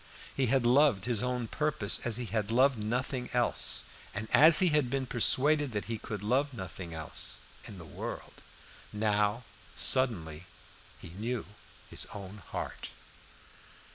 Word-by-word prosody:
He 135 Hz, -2 st, 0 dB
had 130 Hz, 0 st, +1 dB
loved 125 Hz, -5 st, +3 dB
his 120 Hz, -3 st, 0 dB
own 125 Hz, -2 st, -2 dB
purposes 150 Hz, -7 st, +1 dB
as 115 Hz, -2 st, 0 dB
he 125 Hz, -, -4 dB
had 105 Hz, 0 st, -3 dB
loved 130 Hz, 0 st, +3 dB
nothing 125 Hz, +3 st, -3 dB
else, 120 Hz, -1 st, +2 dB, 0.3 s
and 105 Hz, +2 st, -4 dB
as 155 Hz, +2 st, +8 dB
he 185 Hz, -, +5 dB
had 150 Hz, -5 st, +1 dB
been 135 Hz, 0 st, -2 dB
persuaded 140 Hz, +3 st, +1 dB
that 105 Hz, -4 st, -3 dB
he 115 Hz, +1 st, -5 dB
could 105 Hz, -2 st, -7 dB
love 130 Hz, +5 st, 0 dB
nothing 95 Hz, -3 st, -8 dB
else, 80 Hz, -1 st, -2 dB, 0.2 s
in 100 Hz, -, -9 dB
the 85 Hz, -, -11 dB
whole -, -, -15 dB
world. -, -, -8 dB, 0.5 s
Now, 105 Hz, +2 st, 0 dB, 0.3 s
suddenly, 90 Hz, -, +2 dB, 0.5 s
he -, -, -11 dB
knew 110 Hz, +7 st, -4 dB, 0.4 s
his -, -, -1 dB
own 100 Hz, 0 st, -9 dB
heart. -, -, -6 dB
115 Hz, 150 wpm, -30 LUFS, 105-130 Hz, 0.5 s, as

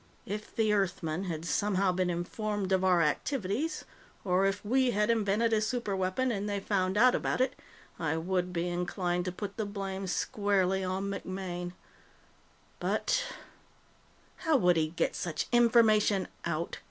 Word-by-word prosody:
"If 210 Hz, +2 st, -6 dB
the 215 Hz, -2 st, +2 dB
Earthmen 180 Hz, -3 st, -1 dB
had 165 Hz, -2 st, -4 dB
somehow 195 Hz, 0 st, +1 dB
been 180 Hz, 0 st, 0 dB
informed 195 Hz, +3 st, -2 dB
of 190 Hz, 0 st, +3 dB
our 180 Hz, -3 st, +4 dB
activities, 225 Hz, -, -1 dB, 0.4 s
or 185 Hz, +1 st, +3 dB
if 195 Hz, +1 st, -2 dB
we 255 Hz, +3 st, +3 dB
had 210 Hz, 0 st, +2 dB
invented 225 Hz, +1 st, +1 dB
a 215 Hz, -, +3 dB
superweapon 215 Hz, +1 st, 0 dB
and 205 Hz, +1 st, -3 dB
they 200 Hz, -1 st, -1 dB
found 190 Hz, -1 st, 0 dB
out 250 Hz, +3 st, +6 dB
about -, -, 0 dB
it, 260 Hz, +1 st, +2 dB, 0.5 s
I 160 Hz, -1 st, 0 dB
would 180 Hz, +2 st, -1 dB
be 175 Hz, 0 st, -1 dB
inclined 175 Hz, 0 st, -1 dB
to 180 Hz, -, -1 dB
put 200 Hz, +2 st, -6 dB
the 220 Hz, -, -1 dB
blame 195 Hz, -1 st, -4 dB
squarely 190 Hz, 0 st, +1 dB
on 190 Hz, +2 st, -2 dB
MacMaine. 185 Hz, -2 st, -5 dB, 1.1 s
But -, -, 0 dB, 0.5 s
" -, -, -33 dB
"How 320 Hz, -4 st, +2 dB
would 180 Hz, -7 st, +4 dB
he 160 Hz, -1 st, +2 dB
get 165 Hz, +2 st, -1 dB
such 165 Hz, -3 st, -2 dB
information 225 Hz, -4 st, +4 dB, 0.2 s
out?" 170 Hz, 0 st, -2 dB
195 Hz, 155 wpm, -30 LUFS, 180-215 Hz, 1.1 s, out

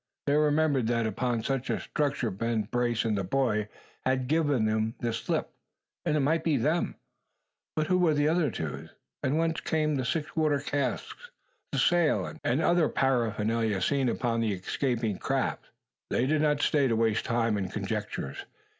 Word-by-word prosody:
They 140 Hz, -, +2 dB
remembered 150 Hz, -4 st, +3 dB
that 115 Hz, -1 st, +1 dB
upon 115 Hz, +2 st, -1 dB
such 135 Hz, +1 st, -2 dB
a -, -, 0 dB
structure 140 Hz, -6 st, -1 dB
Ben 115 Hz, +3 st, -1 dB
Brace 120 Hz, +1 st, 0 dB
and 110 Hz, -2 st, +1 dB
the 100 Hz, -, -1 dB
boy 110 Hz, 0 st, 0 dB, 0.3 s
had 130 Hz, 0 st, +1 dB
given 145 Hz, -5 st, +2 dB
them 110 Hz, +1 st, 0 dB
the 115 Hz, -1 st, -1 dB
slip; 115 Hz, -, -2 dB, 0.5 s
and 155 Hz, -3 st, +2 dB
it -, -, +2 dB
might 160 Hz, +4 st, +1 dB
be 160 Hz, -4 st, +2 dB
them. 155 Hz, +8 st, 0 dB, 0.8 s
But 155 Hz, -, +1 dB
who 180 Hz, +3 st, +2 dB
were 165 Hz, -4 st, +3 dB
the 145 Hz, -, +2 dB, 0.3 s
two 80 Hz, -, -3 dB
others? -, -, -7 dB, 0.3 s
And 140 Hz, +4 st, +1 dB
whence 165 Hz, 0 st, 0 dB
came 155 Hz, -1 st, 0 dB
the 135 Hz, -2 st, 0 dB
six 150 Hz, +3 st, -2 dB
water 155 Hz, -3 st, +2 dB
casks, 145 Hz, -, -3 dB, 0.4 s
the -, -, -2 dB
sail, 175 Hz, -3 st, +2 dB
and 130 Hz, +6 st, +1 dB
other 170 Hz, -3 st, +3 dB
paraphernalia 115 Hz, -4 st, +1 dB
seen 135 Hz, +6 st, +1 dB
upon 115 Hz, -1 st, 0 dB
the 110 Hz, -3 st, +1 dB
escaping 110 Hz, +2 st, -1 dB
craft? -, -, -1 dB, 0.4 s
They 125 Hz, -, +1 dB
did 150 Hz, +2 st, +2 dB
not 150 Hz, -1 st, +2 dB
stay 145 Hz, -3 st, +3 dB
to 115 Hz, -, +1 dB
waste 110 Hz, -1 st, +1 dB
time 115 Hz, -2 st, +1 dB
in 95 Hz, -2 st, -2 dB
conjectures. 70 Hz, -6 st, -4 dB
130 Hz, 170 wpm, -28 LUFS, 115-150 Hz, 0.8 s, remembered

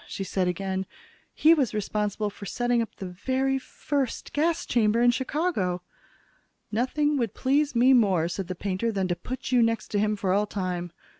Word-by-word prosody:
she 195 Hz, -, -4 dB
said 185 Hz, -1 st, -1 dB
again. 190 Hz, +1 st, -2 dB, 0.4 s
"He 320 Hz, +2 st, +5 dB
was 265 Hz, -9 st, +1 dB
responsible 210 Hz, 0 st, -1 dB
for 200 Hz, 0 st, -9 dB
setting 245 Hz, +3 st, +1 dB
up 225 Hz, -, -5 dB
the 195 Hz, -, -7 dB
very 260 Hz, +9 st, -1 dB
first 270 Hz, -1 st, -3 dB
gas 325 Hz, +3 st, +1 dB
chamber 220 Hz, -1 st, +2 dB
in 240 Hz, 0 st, +5 dB
Chicago." 255 Hz, -, -1 dB, 0.9 s
"Nothing 290 Hz, +6 st, +1 dB
would 235 Hz, -6 st, -1 dB
please 280 Hz, +1 st, +1 dB
me 250 Hz, +3 st, +6 dB
more," 195 Hz, -9 st, +3 dB
said 185 Hz, +1 st, -4 dB
the 185 Hz, -, -4 dB
painter, 200 Hz, +5 st, -1 dB
"than 195 Hz, -3 st, -1 dB
to 175 Hz, -, +1 dB
put 255 Hz, +7 st, -6 dB
you 250 Hz, -1 st, +5 dB
next 230 Hz, -1 st, +1 dB
to 205 Hz, -, 0 dB
him 210 Hz, +1 st, +1 dB
for 195 Hz, -2 st, 0 dB
all 205 Hz, +2 st, +2 dB
time. 180 Hz, -3 st, -3 dB
215 Hz, 180 wpm, -26 LUFS, 190-260 Hz, 0.9 s, me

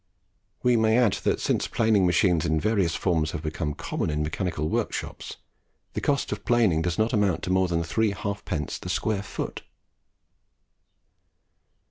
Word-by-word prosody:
We 125 Hz, -1 st, +4 dB
may 110 Hz, 0 st, +3 dB
add 120 Hz, -5 st, +4 dB
that -, -, +2 dB
since -, -, 0 dB
planing 110 Hz, -5 st, +3 dB
machines 85 Hz, -1 st, +3 dB
in 80 Hz, -2 st, +1 dB
various 100 Hz, -4 st, +1 dB
forms 80 Hz, -4 st, 0 dB
have 85 Hz, -, -4 dB
become 75 Hz, -1 st, -3 dB
common -, -, -3 dB
in 75 Hz, 0 st, -1 dB
mechanical 80 Hz, -1 st, -2 dB
workshops, -, -, -3 dB, 0.6 s
the -, -, -3 dB
cost 140 Hz, -1 st, 0 dB
of -, -, -4 dB
planing 110 Hz, -10 st, +3 dB
does 85 Hz, 0 st, -1 dB
not 110 Hz, +3 st, +1 dB
amount 100 Hz, -5 st, +1 dB
to 90 Hz, -, -2 dB
more 95 Hz, 0 st, +3 dB
than 85 Hz, -1 st, 0 dB
three 105 Hz, +7 st, +1 dB
halfpence 100 Hz, -6 st, -4 dB
the -, -, -7 dB
square 110 Hz, -3 st, 0 dB
foot. 100 Hz, -, -5 dB
90 Hz, 155 wpm, -26 LUFS, 80-110 Hz, 0.6 s, We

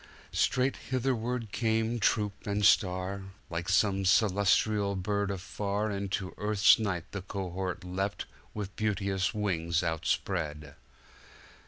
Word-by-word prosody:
Straight 130 Hz, +1 st, +2 dB
hitherward 125 Hz, -3 st, -1 dB
came 115 Hz, +2 st, 0 dB
troop 105 Hz, -1 st, 0 dB
and 100 Hz, 0 st, +1 dB
star; 95 Hz, -1 st, +3 dB, 0.3 s
Like 85 Hz, +2 st, -3 dB
some 100 Hz, +1 st, +3 dB
celestial 100 Hz, +1 st, +3 dB
bird 100 Hz, +2 st, -1 dB
afar 100 Hz, +2 st, -2 dB
Into 100 Hz, -1 st, -3 dB
Earth's 105 Hz, +1 st, +5 dB
night 95 Hz, -6 st, -2 dB
the 100 Hz, -, -4 dB
cohort 95 Hz, -1 st, -4 dB
leapt 95 Hz, +2 st, -3 dB, 0.3 s
With 100 Hz, -2 st, -5 dB
beauteous 100 Hz, -1 st, 0 dB
wings 85 Hz, -5 st, 0 dB
outspread. 75 Hz, -3 st, -2 dB
100 Hz, 110 wpm, -30 LUFS, 95-105 Hz, 0.3 s, Earth's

